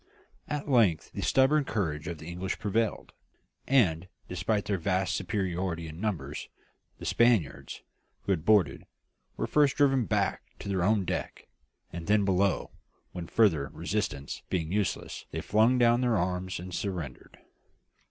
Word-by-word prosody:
At 150 0 -3
length 110 - +3
the - - -5
stubborn 140 +3 +4
courage 85 - -2
of 85 -2 -4
the 80 - -11
English 90 +3 -4
prevailed, 110 0 -1 0.5
and, 95 -11 +3 0.2
despite 95 +4 -1
their 100 -3 -1
vast 95 +2 0
superiority 90 -4 -2
in 80 +3 -9
numbers, 105 -7 -3 0.5
the - - -9
Spaniards, 115 - +1 0.4
who - - -1
had 85 -5 0
boarded, 90 -9 +3 0.5
were - - -1
first 145 -3 +3
driven 135 -4 +3
back - - 0 0.2
to - - -9
their 95 -2 0
own 100 +1 +2
deck - - -4 0.5
and 85 -1 -6
then 105 -1 +3
below, 95 0 +1 0.4
when, 85 -2 -6
further 80 -11 +3
resistance 80 -5 -3
being 85 -2 -1
useless, 100 -1 -2
they - - -4
flung 110 +4 +3
down 120 0 +4
their 120 -3 +2
arms 90 0 -2
and 90 +1 -8
surrendered. 85 -10 -5
95 Hz, 145 wpm, -29 LUFS, 85-110 Hz, 0.5 s, stubborn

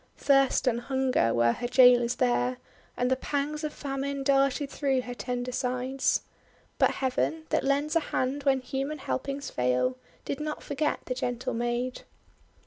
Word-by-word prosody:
Thirst 275 -1 +3
and 240 -2 +1
Hunger 260 - +1
were 120 0 +3
her 240 - -3
jailers 245 -1 +5
there; 125 +1 +1 0.4
and 250 +1 +1
the - - +4
pangs 290 +3 -2
of 305 - -2
Famine 275 0 -4
darted 275 +1 +2
through 270 -3 0
her 245 0 -6
tender 245 0 -3
sides. 255 +1 0 0.6
But - - +5
Heaven, 275 +4 -1
that - - +1
lends 285 +3 +1
a - - +6
hand 275 -2 -2
when 270 -2 +2
human 270 +4 -3
helpings 275 0 -4
fail, 125 0 +1 0.3
did 280 - -3
not 300 0 -4
forget 295 +1 -1
the 255 - -2
gentle 245 -1 -3
maid. 240 +2 -2
260 Hz, 155 wpm, -28 LUFS, 245-280 Hz, 0.6 s, a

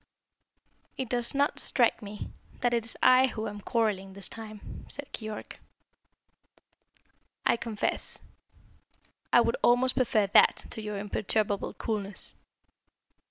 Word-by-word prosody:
"It 260 -3 -3
does 240 +1 +3
not 285 0 +1
strike 240 -4 +2
me 205 0 -8 0.3
that 245 -1 +2
it 230 -1 0
is 230 - -4
I 255 +1 +6
who 220 -3 -4
am 205 0 -7
quarrelling 200 -4 -1
this 195 -1 -3
time," 215 -2 -10
said 285 0 -8
Keyork. 215 -1 -7 1.9
"I - - +4
confess, 230 -3 +1 1.1
I - - +7
would - - 0
almost 250 +1 +4
prefer 225 -5 +2
that 195 - +4
to 220 - -2
your 210 -1 -4
imperturbable 205 0 -1
coolness. 205 -3 -4
220 Hz, 120 wpm, -28 LUFS, 205-245 Hz, 1.9 s, I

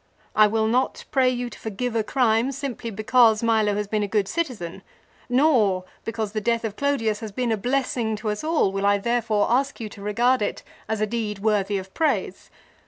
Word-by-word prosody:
I 215 0 +7
will 220 +1 +1
not 245 +4 0
pray 260 -2 +4
you 245 -1 -2
to - - -11
forgive 230 +3 -4
a 225 - +2
crime 240 0 +2
simply 270 -4 -5
because 225 +1 +3
Milo 220 -3 +2
has 210 0 -1
been 210 +1 -1
a 205 - 0
good 200 -1 0
citizen; 215 - -4 0.5
nor, 245 -9 +3 0.2
because 220 -2 -3
the 215 0 -2
death 230 +1 0
of 215 -2 -4
Clodius 225 -7 0
has 220 -2 -6
been 240 +3 -1
a - - +3
blessing 245 -1 -1
to 215 0 -3
us 210 - -5
all 310 -11 +2
will 195 +1 0
I 205 0 +4
therefore 225 -1 0
ask 270 +3 +1
you 220 -2 -5
to 205 - -12
regard 235 +5 +2
it - - -2 0.3
as 220 -1 -1
a - - +3
deed 215 -2 -3
worthy 205 -1 +1
of 190 0 -8
praise. 320 -1 -1
220 Hz, 205 wpm, -24 LUFS, 210-245 Hz, 0.5 s, I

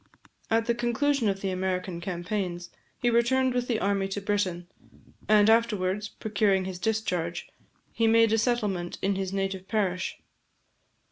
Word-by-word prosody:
At 225 0 +2
the 235 - +2
conclusion 240 +1 +1
of 195 0 -2
the 195 - -1
American 185 -1 -2
campaigns, 175 0 -3 0.3
he 240 -1 +1
returned 255 +2 +2
with 245 0 -1
the 230 -3 0
army 195 -1 0
to 195 +1 -3
Britain; 195 -4 -1 0.6
and 210 -1 +6
afterwards 215 -3 +2
procuring 200 -4 0
his 185 -1 -5
discharge, 180 -6 -2 0.4
he 230 - +1
made 225 0 +5
a 225 - +3
settlement 210 -7 -1
in 195 +1 +2
his 190 -1 -3
native 195 -1 -3
parish. 190 -5 -1
205 Hz, 145 wpm, -27 LUFS, 185-225 Hz, 0.6 s, and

